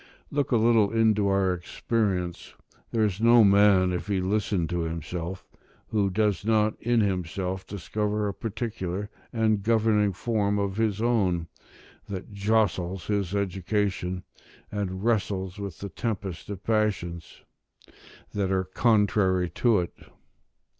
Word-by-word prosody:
Look 145 Hz, -1 st, -1 dB
a 120 Hz, -, +4 dB
little 110 Hz, -2 st, +4 dB
into 110 Hz, -3 st, +3 dB
our 95 Hz, -1 st, +2 dB
experience: 90 Hz, 0 st, -2 dB, 0.3 s
there 115 Hz, -1 st, +1 dB
is 105 Hz, -1 st, -1 dB
no 115 Hz, 0 st, +7 dB
man, 100 Hz, -2 st, +5 dB
if 90 Hz, 0 st, -3 dB
he 100 Hz, -2 st, 0 dB
listen 95 Hz, -2 st, 0 dB
to 90 Hz, -1 st, -1 dB
himself, 85 Hz, +2 st, -4 dB, 0.4 s
who 105 Hz, -3 st, +1 dB
does 105 Hz, -1 st, +1 dB
not 110 Hz, 0 st, +2 dB
in 120 Hz, -1 st, +2 dB
himself 95 Hz, -1 st, -2 dB
discover 105 Hz, +2 st, -2 dB
a 100 Hz, -, -2 dB
particular 105 Hz, -3 st, -4 dB, 0.2 s
and 110 Hz, -3 st, +1 dB
governing 110 Hz, -1 st, +3 dB
form 105 Hz, 0 st, 0 dB
of 100 Hz, -1 st, -1 dB
his 110 Hz, -1 st, 0 dB
own, 95 Hz, -8 st, +1 dB, 0.6 s
that 100 Hz, +1 st, -6 dB
jostles 100 Hz, -3 st, 0 dB
his 100 Hz, -2 st, -1 dB
education, 95 Hz, -1 st, -1 dB, 0.5 s
and 95 Hz, -2 st, -3 dB
wrestles 100 Hz, -4 st, -1 dB
with 100 Hz, -5 st, -6 dB
the 100 Hz, -, -6 dB
tempest 95 Hz, -2 st, -4 dB
of 100 Hz, -2 st, -6 dB
passions 100 Hz, -7 st, -1 dB, 0.9 s
that 100 Hz, -2 st, 0 dB
are 95 Hz, -1 st, +2 dB
contrary 95 Hz, -3 st, +2 dB
to 115 Hz, -6 st, +3 dB
it. 85 Hz, -, -5 dB
100 Hz, 130 wpm, -26 LUFS, 95-110 Hz, 0.9 s, no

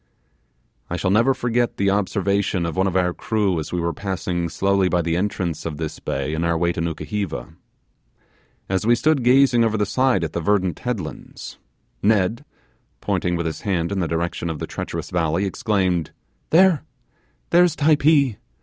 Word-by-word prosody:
I 85 Hz, -, -2 dB
shall 90 Hz, +2 st, 0 dB
never 120 Hz, +6 st, +3 dB
forget 120 Hz, 0 st, 0 dB
the 100 Hz, 0 st, +2 dB
observation 100 Hz, -2 st, 0 dB
of 85 Hz, -, -3 dB
one 95 Hz, +1 st, +2 dB
of 95 Hz, -, -2 dB
our 90 Hz, -1 st, +1 dB
crew 100 Hz, -5 st, 0 dB
as 75 Hz, -, -6 dB
we 90 Hz, -, -1 dB
were 85 Hz, 0 st, -1 dB
passing 90 Hz, -2 st, -3 dB
slowly 95 Hz, +2 st, +1 dB
by 90 Hz, 0 st, +1 dB
the 85 Hz, 0 st, 0 dB
entrance 90 Hz, -3 st, -2 dB
of 80 Hz, -3 st, -5 dB
the 80 Hz, -1 st, -4 dB
bay 70 Hz, +3 st, -2 dB
in 80 Hz, +1 st, -1 dB
our 85 Hz, 0 st, +1 dB
way 85 Hz, +1 st, +1 dB
to 85 Hz, -, -4 dB
Nukuheva. 85 Hz, -, -4 dB, 1.1 s
As 95 Hz, -1 st, -1 dB
we 120 Hz, +2 st, +4 dB
stood 150 Hz, +1 st, +1 dB
gazing 125 Hz, -1 st, +5 dB
over 110 Hz, -1 st, +1 dB
the 105 Hz, -, +1 dB
side 130 Hz, -3 st, +1 dB
at 80 Hz, -, -3 dB
the 85 Hz, -, -2 dB
verdant 95 Hz, -2 st, +1 dB
headlands, 105 Hz, -11 st, -6 dB, 0.4 s
Ned, 110 Hz, +4 st, +2 dB, 0.6 s
pointing 90 Hz, 0 st, -1 dB
with 85 Hz, 0 st, -2 dB
his 80 Hz, -2 st, -4 dB
hand 90 Hz, -4 st, -1 dB
in 100 Hz, -, -1 dB
the 85 Hz, -, 0 dB
direction 85 Hz, +1 st, -2 dB
of 80 Hz, -, -3 dB
the -, -, -4 dB
treacherous -, -, -5 dB
valley, 85 Hz, +2 st, 0 dB
exclaimed, 95 Hz, -, 0 dB, 0.4 s
'There 175 Hz, -2 st, +5 dB, 0.7 s
there's 175 Hz, -2 st, +5 dB
Typee. 145 Hz, -5 st, +3 dB
95 Hz, 175 wpm, -22 LUFS, 85-115 Hz, 1.1 s, gazing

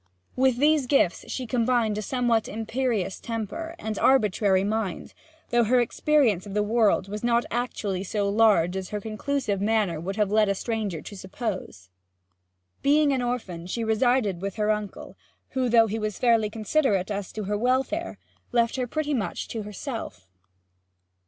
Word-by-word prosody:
With 260 Hz, -1 st, +3 dB
these 295 Hz, 0 st, +3 dB
gifts 245 Hz, -10 st, +1 dB
she 255 Hz, -, -3 dB
combined 235 Hz, -2 st, +1 dB
a 215 Hz, -, -2 dB
somewhat 235 Hz, -1 st, +1 dB
imperious 225 Hz, -3 st, -2 dB
temper 235 Hz, -, -5 dB
and 220 Hz, -, -4 dB
arbitrary 205 Hz, -6 st, +3 dB
mind, 210 Hz, -3 st, -3 dB, 0.4 s
though 240 Hz, 0 st, +4 dB
her 250 Hz, +3 st, +4 dB
experience 240 Hz, -, +2 dB
of 200 Hz, -, -7 dB
the 210 Hz, -, +2 dB
world 215 Hz, -3 st, +2 dB
was 210 Hz, +2 st, -6 dB
not 235 Hz, 0 st, +2 dB
actually 210 Hz, -5 st, -2 dB
so 200 Hz, +1 st, -1 dB
large 200 Hz, -4 st, +3 dB
as 190 Hz, -1 st, -4 dB
her 210 Hz, -, -3 dB
conclusive 215 Hz, 0 st, -2 dB
manner 205 Hz, -6 st, +1 dB
would 190 Hz, +4 st, -4 dB
have 210 Hz, -2 st, +1 dB
led 215 Hz, 0 st, +4 dB
the 200 Hz, -, +1 dB
stranger 210 Hz, -6 st, -3 dB
to 205 Hz, -, -9 dB
suppose. 190 Hz, -, -6 dB, 0.9 s
Being 290 Hz, 0 st, +4 dB
an 260 Hz, -, 0 dB
orphan, 210 Hz, -9 st, -3 dB
she 230 Hz, +5 st, -3 dB
resided 220 Hz, -4 st, +1 dB
with 195 Hz, -1 st, -4 dB
her 215 Hz, -1 st, +1 dB
uncle, 210 Hz, -2 st, -5 dB, 0.3 s
who, 260 Hz, -2 st, -1 dB
though 230 Hz, -1 st, +6 dB
he 220 Hz, +1 st, -3 dB
was 215 Hz, -2 st, -3 dB
fairly 230 Hz, -3 st, +3 dB
considerate 215 Hz, -3 st, 0 dB
as 200 Hz, -2 st, -4 dB
to 215 Hz, -, -4 dB
her 205 Hz, +2 st, -1 dB
welfare, 260 Hz, +9 st, 0 dB, 0.3 s
left 235 Hz, +1 st, +1 dB
her 250 Hz, -1 st, -1 dB
pretty 300 Hz, +2 st, -2 dB
much 205 Hz, -10 st, -2 dB
to 225 Hz, -, -4 dB
herself. 210 Hz, -, -6 dB
220 Hz, 165 wpm, -26 LUFS, 200-245 Hz, 0.9 s, though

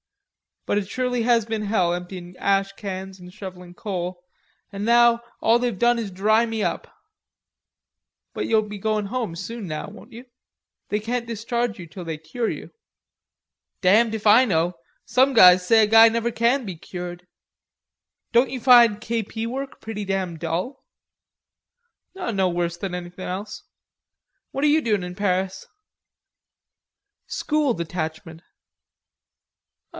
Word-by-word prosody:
But 205 Hz, -, +1 dB
it 195 Hz, -, -6 dB
surely 250 Hz, 0 st, -1 dB
has 235 Hz, -2 st, +3 dB
been 220 Hz, -1 st, -3 dB
hell 190 Hz, -5 st, +1 dB
emptying 180 Hz, 0 st, -7 dB
ash 195 Hz, 0 st, +1 dB
cans 190 Hz, -1 st, -7 dB
and 180 Hz, 0 st, -12 dB
shovelling 180 Hz, -2 st, -10 dB
coal 180 Hz, -3 st, -5 dB, 0.5 s
an' 200 Hz, 0 st, -5 dB
now 235 Hz, 0 st, +5 dB, 0.2 s
all 230 Hz, +1 st, +4 dB
they've 240 Hz, -5 st, -1 dB
done 240 Hz, +3 st, +3 dB
is 220 Hz, -3 st, -3 dB
dry 215 Hz, +5 st, +3 dB
me 225 Hz, -2 st, -3 dB
up." -, -, -2 dB, 1.5 s
"But -, -, -3 dB
you'll 220 Hz, -1 st, +3 dB
be 210 Hz, 0 st, -7 dB
goin' 215 Hz, 0 st, -1 dB
home 225 Hz, -6 st, -3 dB
soon 200 Hz, +4 st, -6 dB
now, 155 Hz, -2 st, -4 dB
won't 220 Hz, +4 st, -14 dB
you? 240 Hz, +2 st, -11 dB, 0.6 s
They 210 Hz, -, 0 dB
can't 235 Hz, +2 st, -3 dB
discharge 235 Hz, 0 st, -2 dB
you 175 Hz, -3 st, -9 dB
till 180 Hz, +3 st, -9 dB
they 160 Hz, -1 st, -4 dB
cure 160 Hz, +10 st, -3 dB
you." -, -, -7 dB, 1.1 s
"Damned 220 Hz, +4 st, +4 dB
if 220 Hz, -, -7 dB
I 220 Hz, +5 st, +7 dB
know.... 175 Hz, -4 st, 0 dB, 0.3 s
Some 260 Hz, +2 st, +3 dB
guys 180 Hz, -5 st, +7 dB
say 220 Hz, +3 st, +5 dB
a -, -, +3 dB
guy 225 Hz, +1 st, +8 dB
never 230 Hz, +1 st, -1 dB
can 235 Hz, +3 st, +1 dB
be 190 Hz, -4 st, -5 dB
cured...." 175 Hz, +1 st, -8 dB, 1.0 s
"Don't 240 Hz, +2 st, +4 dB
you 260 Hz, -, -4 dB
find 235 Hz, -4 st, +6 dB
K.P. 225 Hz, -1 st, -3 dB
work 270 Hz, +3 st, -6 dB
pretty 210 Hz, -2 st, -5 dB
damn 190 Hz, -3 st, -2 dB
dull?" 170 Hz, -, -4 dB, 1.3 s
"No 205 Hz, -, 0 dB
worse 175 Hz, -1 st, -2 dB
than 180 Hz, 0 st, -4 dB
anything 180 Hz, +1 st, -7 dB
else. 200 Hz, +4 st, -6 dB, 0.9 s
What 275 Hz, -, -3 dB
are -, -, +5 dB
you 305 Hz, +2 st, +4 dB
doin' 210 Hz, -7 st, 0 dB
in 180 Hz, 0 st, -6 dB
Paris?" 190 Hz, -1 st, -1 dB, 1.6 s
"School 300 Hz, -4 st, 0 dB
detachment." 160 Hz, -1 st, -5 dB
210 Hz, 145 wpm, -23 LUFS, 180-235 Hz, 1.6 s, guy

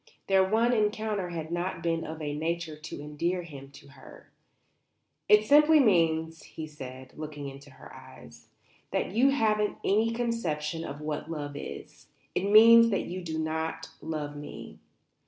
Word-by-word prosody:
Their 190 Hz, -1 st, +4 dB
one 225 Hz, +5 st, +2 dB
encounter 210 Hz, -3 st, 0 dB
had 165 Hz, -2 st, -6 dB
not 175 Hz, 0 st, -3 dB
been 165 Hz, -1 st, 0 dB
of 160 Hz, 0 st, -7 dB
a 145 Hz, -1 st, -3 dB
nature 165 Hz, 0 st, -3 dB
to 155 Hz, -1 st, -9 dB
endear 170 Hz, +5 st, -2 dB
him 140 Hz, -5 st, -11 dB
to 140 Hz, -, -15 dB
her. 140 Hz, -, -16 dB, 1.0 s
"It 210 Hz, +1 st, +6 dB
simply 300 Hz, +4 st, +6 dB
means," 165 Hz, -, +2 dB
he 160 Hz, -, -8 dB
said, 130 Hz, -4 st, -10 dB
looking 150 Hz, -2 st, -7 dB
into 140 Hz, +1 st, -11 dB
her 130 Hz, -, -14 dB
eyes, -, -, -14 dB, 0.4 s
"that -, -, -2 dB
you 245 Hz, +7 st, +4 dB
haven't 215 Hz, -6 st, +1 dB
any 215 Hz, +3 st, +2 dB
conception 175 Hz, -10 st, -2 dB
of 145 Hz, -1 st, -7 dB
what 150 Hz, 0 st, -4 dB
love 145 Hz, -3 st, -5 dB
is. 145 Hz, -, -9 dB, 0.3 s
It 195 Hz, +2 st, -1 dB
means 230 Hz, +2 st, +8 dB
that 200 Hz, -, -1 dB
you 185 Hz, +1 st, -5 dB
don't 160 Hz, 0 st, -3 dB
love 150 Hz, -2 st, -4 dB
me." 145 Hz, 0 st, -9 dB
165 Hz, 155 wpm, -28 LUFS, 150-210 Hz, 1.0 s, means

